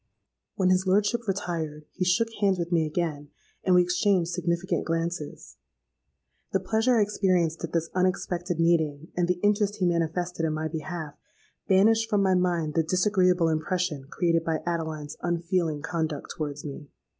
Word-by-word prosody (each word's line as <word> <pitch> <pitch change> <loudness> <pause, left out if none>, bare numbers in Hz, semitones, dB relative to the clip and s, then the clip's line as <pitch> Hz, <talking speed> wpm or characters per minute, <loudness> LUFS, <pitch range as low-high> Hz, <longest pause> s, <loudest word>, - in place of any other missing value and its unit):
"When 185 -1 +2
his 185 +1 +2
lordship 210 +4 +2
retired, 165 -6 -3
he 185 - -3
shook 200 +6 +2
hands 195 -2 +3
with 170 0 -3
me 165 -2 +2
again, 150 -2 -3 0.3
and 185 - +4
we 180 - +6
exchanged 180 0 +1
significant 170 +1 -1
glances. 165 -2 -4 1.0
The 195 - +3
pleasure 225 +6 +2
I 215 - +5
experienced 180 -6 0
at 165 - -4
this 165 -1 -1
unexpected 180 -1 -1
meeting, 160 -2 +1
and 175 -1 +1
the 180 0 +1
interest 205 0 +2
he 195 -4 0
manifested 170 0 -1
in 160 -1 +1
my 155 +1 -2
behalf, 160 -1 -5 0.5
banished 225 +4 +4
from 205 -3 +2
my 190 -1 +3
mind 175 -4 +1
the 165 - +3
disagreeable 180 0 +2
impression 160 -2 -1
created 165 -1 +1
by 160 -1 -2
Adeline's 160 -3 -3
unfeeling 170 -3 -1
conduct 160 -4 -3
towards 145 -3 -5
me. 145 0 -8
175 Hz, 155 wpm, -27 LUFS, 160-185 Hz, 1.0 s, we